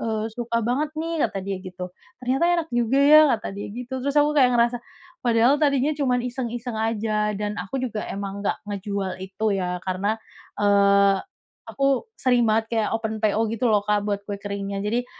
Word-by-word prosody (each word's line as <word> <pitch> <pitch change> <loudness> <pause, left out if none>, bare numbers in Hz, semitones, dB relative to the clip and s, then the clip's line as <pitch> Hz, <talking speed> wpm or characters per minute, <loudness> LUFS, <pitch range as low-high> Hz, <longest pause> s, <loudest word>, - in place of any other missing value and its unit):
eee, 220 -1 -2
"Suka 235 -1 -2
banget 280 +6 0
nih," 325 0 0
kata 195 - -5
dia 195 0 -3
gitu. 180 -1 -7 0.3
"Ternyata 265 +6 +1
enak 330 -2 -2
juga 240 +2 +2
ya," 305 +2 +9 0.2
Kata 215 - -7
dia 200 - -6
gitu. 250 +4 -6
Terus 280 +2 -2
aku 295 0 +4
kayak 250 -3 +5
ngerasa, 235 +1 +2 0.5
padahal 240 +3 +4
tadinya 280 0 +2
cuma 270 -4 +1
iseng-iseng 240 -2 -4
aja 215 -1 0
dan 205 +1 -2
aku 195 +9 -5
juga 220 -4 -3
emang 200 0 -5
nggak - - 0
ngejual 200 -2 -4
itu 195 +3 -4
ya, 180 -1 -2
karena, 195 +4 -1 0.4
eee, 200 -1 +4 0.5
aku 275 +2 +1 0.2
sering 245 -2 +3
banget 220 +1 +2
kayak 220 -2 +1
open 220 -1 -4
PO 220 +1 +2
gitu 230 +2 0
loh 210 - +5
Kak 210 -1 +2
buat 205 -1 -2
kue 205 - -3
keringnya. 200 -1 -4
Jadi 235 +4 -1
220 Hz, 180 wpm, -24 LUFS, 200-250 Hz, 0.5 s, ya